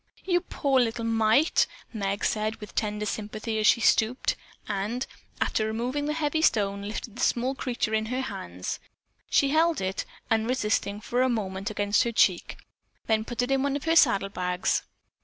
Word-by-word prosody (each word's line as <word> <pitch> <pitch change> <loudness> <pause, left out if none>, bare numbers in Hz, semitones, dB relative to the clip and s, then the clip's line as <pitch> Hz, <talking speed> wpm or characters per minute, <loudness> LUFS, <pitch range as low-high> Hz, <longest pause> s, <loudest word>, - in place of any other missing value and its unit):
"You 355 -2 +2
poor 280 -6 +1
little 230 -1 0
mite," 225 +6 +3 0.3
Meg 200 -1 -2
said 215 +1 0
with 210 -2 -11
tender 210 -1 -1
sympathy 215 +1 -3
as 215 - +3
she 235 - +5
stooped, 225 +2 +2 0.3
and, 210 +5 -2 0.3
after 215 - +1
removing 250 +7 -2
the 300 - 0
heavy 315 0 0
stone, 200 -8 +2
lifted 210 +2 -6
the - - -4
small 250 +2 +1
creature 240 -4 -2
in 220 0 +1
her 250 +3 -1
hands. 90 - -5 0.5
She 280 - +3
held 320 +2 +3
it, 190 0 -2 0.3
unresisting, 220 -3 0
for 245 +3 0
a 260 - +3
moment 200 -3 -2
against 205 -1 +1
her 235 - -1
cheek, 185 -5 +2 0.5
then 220 -1 +2
put 240 +1 -2
it 250 - -2
into 270 0 +3
one 280 0 0
of 285 - -3
her 325 0 +2
saddle 200 -10 +5
bags. 180 -2 0
225 Hz, 175 wpm, -27 LUFS, 205-255 Hz, 0.5 s, she